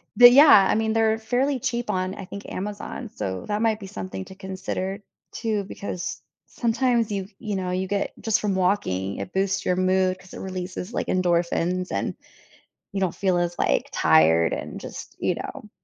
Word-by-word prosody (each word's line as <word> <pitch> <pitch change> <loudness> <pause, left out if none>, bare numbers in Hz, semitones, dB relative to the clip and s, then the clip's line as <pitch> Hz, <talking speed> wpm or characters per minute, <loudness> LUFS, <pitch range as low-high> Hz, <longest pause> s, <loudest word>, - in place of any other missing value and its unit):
but, 245 0 +10
yeah, 255 -8 +8
I - - +3
mean, 220 0 +1
they're 225 0 +3
fairly 255 +5 0
cheap 235 -1 -2
on, 185 -1 -1
I 195 - -7
think, 200 +2 -8
Amazon, 205 +4 -5
so 95 - -4
that 210 +2 -1
might 220 -1 +2
be 195 - -8
something 190 -1 -6
to 190 - -12
consider 190 +1 -4 0.3
too, 215 -3 -1
because 190 -2 -5 0.2
sometimes 235 -1 +1
you 195 -1 -2
you 210 -3 -3
know, 185 -1 -2
you 185 +1 -1
get 200 0 -1
just 220 -1 +2
from 205 -2 0
walking, 140 - 0
it 180 - -6
boosts 195 0 0
your 180 - +2
mood, 185 0 +2
'cause 185 - -16
it - - -7
releases, 185 +2 -5
like, - - -2
endorphins, 180 0 +1
and - - -2 0.8
you 195 - -2
don't 180 -3 +1
feel 185 -3 +1
as, 175 0 -1
like, 65 - +1
tired, 80 +1 +4
and - - -5
just - - -9
you - - +1
know? - - -7
190 Hz, 185 wpm, -24 LUFS, 185-220 Hz, 0.8 s, but